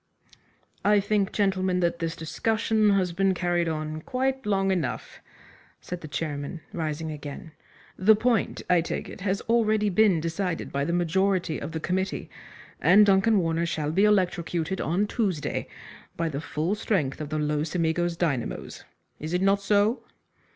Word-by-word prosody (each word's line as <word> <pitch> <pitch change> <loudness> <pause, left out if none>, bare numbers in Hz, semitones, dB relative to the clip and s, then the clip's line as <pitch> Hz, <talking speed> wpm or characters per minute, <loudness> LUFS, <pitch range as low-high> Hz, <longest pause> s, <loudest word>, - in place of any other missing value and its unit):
"I 210 0 +5
think, 200 -1 0
gentlemen, 190 -2 +1
that 170 -1 0
this 165 -1 -2
discussion 220 +5 +1
has 190 -3 +2
been 195 +1 +2
carried 175 -1 0
on 155 0 -4
quite 265 +3 -2
long 195 -1 +2
enough," 165 -10 -3 0.6
said 180 -1 -7
the 155 - -7
chairman, 150 +1 -4
rising 160 -1 -3
again. 150 +2 -8 0.5
"The 210 +4 +6
point, 230 0 0
I 180 -2 +4
take 165 - -4
it, - - -10
has 195 +1 -1
already 215 -2 +2
been 195 -2 +4
decided 170 +2 -3
by 140 0 -1
the 170 - -1
majority 175 0 +1
of 145 - -5
the 160 - -3
committee, 190 +4 -2 0.5
and 190 +8 +7
Duncan 200 +2 +4
Warner 165 -1 0
shall 155 -3 -2
be 195 +6 +3
electrocuted 180 -3 +1
on 180 +6 +1
Tuesday 195 -8 -2 0.5
by 165 -1 0
the 140 -1 -4
full 155 +4 -2
strength 155 -10 -1
of 150 - -5
the 155 - -2
Los 150 +1 -1
Amigos 170 0 0
dynamos. 140 -9 -2 0.4
Is 155 +3 -5
it 180 - +1
not 195 +1 +3
so?" 210 +4 +2
180 Hz, 160 wpm, -26 LUFS, 160-200 Hz, 0.6 s, and